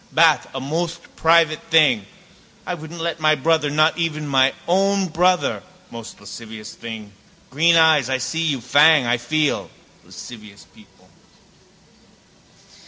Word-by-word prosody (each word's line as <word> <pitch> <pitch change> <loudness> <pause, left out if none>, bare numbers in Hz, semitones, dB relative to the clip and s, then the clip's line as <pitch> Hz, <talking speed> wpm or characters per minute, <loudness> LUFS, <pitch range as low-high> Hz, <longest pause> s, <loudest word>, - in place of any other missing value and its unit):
Bath - - +3
a - - -3
most 165 +5 -5
private 165 -1 +2
thing. 145 -11 +3 0.6
I - - -4
wouldn't 165 0 -9
let 165 0 -3
my 155 0 +3
brother, 155 +1 0
not 155 +3 +1
even 155 -3 -3
my 135 -1 +2
own 195 +2 +1
brother, 180 +3 0 0.3
most 115 -1 -10
lascivious 110 +1 -10
thing. 110 -3 -9 0.4
Green 165 +5 +3
eyes, 160 -5 +4
I 130 - 0
see 160 +5 -3
you. 140 -6 -1
Fang, 145 +3 +4
I 120 +1 +1
feel. 150 +5 -2 0.3
Lascivious 105 -4 -13
people. - - -22
155 Hz, 130 wpm, -20 LUFS, 125-165 Hz, 0.6 s, eyes